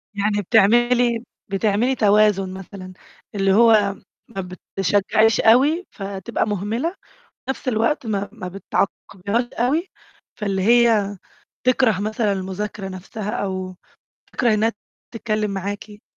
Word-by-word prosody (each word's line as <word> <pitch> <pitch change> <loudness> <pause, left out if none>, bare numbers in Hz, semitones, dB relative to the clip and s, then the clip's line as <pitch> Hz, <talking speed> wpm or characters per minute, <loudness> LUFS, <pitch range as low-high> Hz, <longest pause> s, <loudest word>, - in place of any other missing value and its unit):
يعني، 205 0 0
بتعملي 240 +4 +3 0.3
بتعملي 215 +6 +1
توازن 205 -3 +3
مثلًا، 190 -1 -9 0.4
اللي 195 -1 +2
هو 215 -3 +5 0.3
ما 195 -4 -5 0.4
بِتشجعيش 205 +3 +3
أوي 285 +11 +4
فتبقى 195 +2 -3
مُهمِلة، 210 - -1
وفي 380 - -19 0.4
نفس 265 - -4
الوقت 230 +3 0
ما 200 -2 -2
ما 185 - -7
بتعاقبيهاش 200 +3 -2
أوي، 300 +10 0 0.5
فاللي 195 -2 -1
هي 225 -3 +3 0.5
تِكره 250 -6 +3
مثلًا 215 0 0
المذاكرة 195 +1 -4
نفسَها 195 +3 -6
أو 185 -2 -3 0.6
تِكره 235 -4 +2
إنهّا 225 +2 +1 0.4
تتكلم 215 -2 -1
معاكِ. 205 +2 -6
210 Hz, 110 wpm, -21 LUFS, 195-230 Hz, 0.6 s, هو